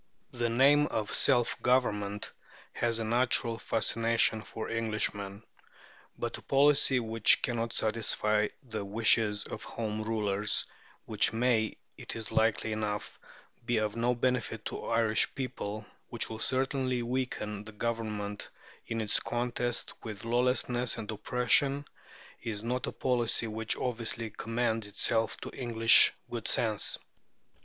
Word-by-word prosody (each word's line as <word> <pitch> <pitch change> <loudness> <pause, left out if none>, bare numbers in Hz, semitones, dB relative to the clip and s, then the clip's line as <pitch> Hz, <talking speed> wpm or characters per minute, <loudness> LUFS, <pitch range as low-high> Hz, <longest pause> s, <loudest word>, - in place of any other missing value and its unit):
"The 120 -1 -1
name 140 +5 +5
of 105 -7 -3
'Self 125 -4 +2
government' 105 -5 0 0.4
has 115 -1 0
a 115 - -2
natural 115 0 +2
fascination 115 0 +1
for 110 +1 -7
Englishmen; 110 -2 -2 0.7
but - - -4
a - - -15
policy 140 -1 +4
which 115 -2 +3
cannot 115 -2 -1
satisfy 105 -1 +1 0.2
the 110 -5 -5
wishes 105 0 +2
of - - -7
Home 110 -2 -4
Rulers, 105 -2 0 0.4
which 105 -1 +2
may 115 -2 +1 0.2
it - - -7
is 110 -1 -4
likely 110 0 +1
enough 105 -1 -3 0.4
be 120 0 0
of 105 -1 -1
no 120 +1 +1
benefit 125 -1 -1
to - - -4
the - - -8
Irish 115 -1 +2
people, 110 -5 -5 0.2
which - - -3
will 110 - -6
certainly 130 0 0
weaken 115 -4 -3
the 110 - -9
Government 105 -2 -4 0.4
in 115 0 -2
its 105 -1 +1
contest 120 0 -2
with 110 -2 -7
lawlessness 125 0 +1
and 110 0 -5
oppression, 125 +6 +2 0.6
is 110 -3 -5
not 125 +2 -2
a - - -2
policy 120 -2 0
which 110 0 -1
obviously 115 -2 -3
commends 115 0 -2
itself 110 +2 0
to - - -6
English 115 -2 +6 0.2
good 120 -2 -4
sense." 110 -3 +1
115 Hz, 130 wpm, -30 LUFS, 110-120 Hz, 0.7 s, English